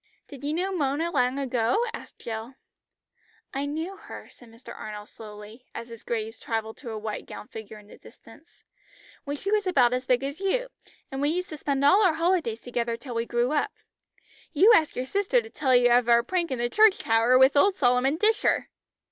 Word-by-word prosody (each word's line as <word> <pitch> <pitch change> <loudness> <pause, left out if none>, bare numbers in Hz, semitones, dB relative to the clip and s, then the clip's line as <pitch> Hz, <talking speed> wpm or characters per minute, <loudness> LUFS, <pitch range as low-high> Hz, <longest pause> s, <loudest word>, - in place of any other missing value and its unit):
"Did 280 -2 -12
you 290 - -1
know 360 +5 -1
Mona 305 +2 0
long 255 -3 +1
ago?" 255 - +1
asked - - -10
Jill. 225 +3 -7 1.0
"I 275 +1 -2
knew 325 +6 -4
her," - - -11
said 245 - -18
Mr. 230 +2 -12
Arnold 210 -1 -8
slowly, 215 +2 -12
as 235 - -7
his 230 -1 -10
gaze 225 -1 -4
travelled 220 -1 -4
to 250 - -9
a 220 - -5
white 215 0 -5
gowned - - -10
figure 220 -1 -9
in 210 - -15
the - - -16
distance, - - -18 0.6
"when 285 0 -3
she 395 +7 -4
was 420 -2 +1
about 250 -9 +3
as 255 0 -2
big 250 +1 +2
as 280 +4 -4
you, - - -1 0.4
and 270 +1 -4
we 290 - +2
used 360 +3 -2
to 310 - -7
spend 280 -1 -1
all 390 +9 +6
our 350 -5 +3
holidays 330 -9 0
together 235 -1 -2
till 245 +1 -8
we 230 0 -2
grew 240 +2 0
up. 300 - 0 0.8
You 390 +10 +6
ask 315 -5 +2
your 250 - -2
sister 400 - +1
to 450 -1 -9
tell 265 -4 +1
you 245 0 +5
of 240 0 +4
our 235 0 +5
prank 345 +4 -1
in 260 - -2
the 240 0 0
church 425 - +5
tower 225 +3 +3
with 265 +2 +5
old 385 +7 +4
Solomon 250 +1 +2
Disher!" 430 +4 +1
260 Hz, 205 wpm, -26 LUFS, 235-330 Hz, 1.0 s, all